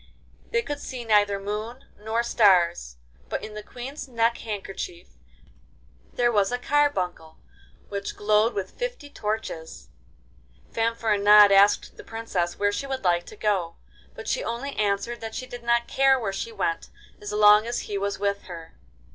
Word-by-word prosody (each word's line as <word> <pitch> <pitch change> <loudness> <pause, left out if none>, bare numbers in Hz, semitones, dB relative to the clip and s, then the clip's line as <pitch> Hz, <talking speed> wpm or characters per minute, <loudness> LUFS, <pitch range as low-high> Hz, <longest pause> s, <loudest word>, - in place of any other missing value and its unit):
They 465 0 0
could 290 -7 -4
see 250 -4 -7
neither 205 -2 +3
moon 215 +5 -5
nor 220 +2 -2
stars, 175 - +3 0.3
but - - -3
in 215 - -9
the 210 - -6
Queen's 255 +7 -8
neck 235 -1 +1
handkerchief 195 -5 -6 1.0
there 240 -1 +2
was 205 -1 +2
a 245 - 0
carbuncle 195 - 0 0.5
which 200 0 -5
glowed 215 +2 +2
like 200 -2 -1
fifty - - -6
torches. 210 - -5 0.8
Fanfaronade 210 -3 +5
asked 200 +1 +4
the - - -10
Princess 195 -6 -3
where 205 0 +2
she 275 +7 -4
would 265 -3 -4
like 175 -1 +1
to - - -10
go, 195 -6 -1 0.4
but - - -9
she - - 0
only 275 - -4
answered 210 +3 -1
that 225 -1 -6
she 255 - -4
did 245 -1 -9
not 235 0 +1
care 270 -1 +3
where 200 -5 -3
she 230 +4 -4
went 165 -6 -2 0.3
as 205 - -6
long 210 +1 +6
as 240 - -2
he 205 - -6
was 200 0 -2
with 200 0 -2
her. 165 -2 -10
210 Hz, 160 wpm, -25 LUFS, 200-235 Hz, 1.0 s, long